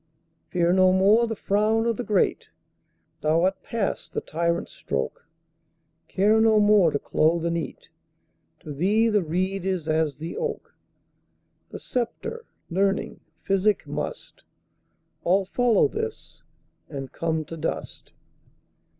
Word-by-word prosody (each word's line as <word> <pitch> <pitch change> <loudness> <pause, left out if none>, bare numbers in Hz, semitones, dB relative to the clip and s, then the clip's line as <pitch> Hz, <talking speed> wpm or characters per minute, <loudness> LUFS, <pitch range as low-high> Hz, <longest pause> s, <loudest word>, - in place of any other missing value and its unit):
Fear 175 -1 +2
no 185 0 +5
more 205 +5 +4
the 225 - -3
frown 215 +3 +1
o' 235 - +2
the 245 - -4
great, 210 -5 0 0.7
Thou 160 +2 +2
art 190 +1 0
past 225 -4 -3
the - - -2
tyrant's 170 +1 -2
stroke; 65 -2 -4 0.8
Care 210 +3 +3
no 220 -1 +5
more 205 -4 +5
to 145 - -1
clothe 165 +4 +1
and 170 0 0
eat; 165 -3 -6 0.7
To 150 - -7
thee 205 +10 +2
the 210 -2 +2
reed 185 +3 -2
is 185 -4 -2
as 155 -2 0
the 160 +3 -6
oak:The 470 -1 -10
sceptre, 255 - -4 0.2
learning, 195 +2 0 0.2
physic, 195 +2 +2
mustAll 190 +3 -5
follow 245 - +3
this, 445 +1 -6 0.5
and 135 -3 -6
come 160 -1 -2
to 165 - -8
dust. 165 0 -5
190 Hz, 125 wpm, -25 LUFS, 165-215 Hz, 0.8 s, no